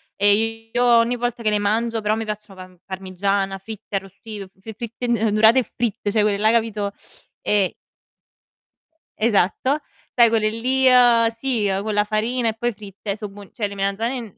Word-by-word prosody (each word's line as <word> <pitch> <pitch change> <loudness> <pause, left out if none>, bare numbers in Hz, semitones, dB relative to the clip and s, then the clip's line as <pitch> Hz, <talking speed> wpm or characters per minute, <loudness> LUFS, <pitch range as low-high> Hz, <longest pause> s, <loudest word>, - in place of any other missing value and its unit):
e 225 +3 +1
io 245 +1 +2
ogni 235 0 +4
volta 240 -1 -3
che 220 - +1
le 210 - +2
mangio 225 +2 0
però 210 0 +1
a - - -1
me 225 - -3
piacciono 210 -2 -7
pam 185 0 -12
parmigiana, 195 +1 -2
fritte, 210 +1 -8
arrostito 195 +1 -6
f 190 0 -32
f 220 +3 -8
fritte, 235 +2 -6
uhm, 240 - +3 0.2
'ndorate 220 +4 +5
e - - +1
fritte, 225 -3 -1
cioè, 215 0 +2
quelle 205 -1 +2
là, 215 +2 +2
hai 220 - +4
capito 215 -3 0 0.5
e 200 -3 +1 1.5
Esatto. 225 +6 +2 0.4
Sai 235 -2 +6
quelle 220 -1 +2
lì, 255 +4 +1
uhm, 245 -2 +6
sì, 230 -2 -1
con 215 0 -2
la 210 0 +2
farina 230 +3 -1
e - - -2
poi 240 +2 -1
fritte, 200 0 -6
so' 210 -1 -5
buo 200 0 -13
cioè, 210 -3 -2
le 200 - -9
melanzane 200 +6 -1
n 220 -5 -12
215 Hz, 190 wpm, -22 LUFS, 200-230 Hz, 1.5 s, Sai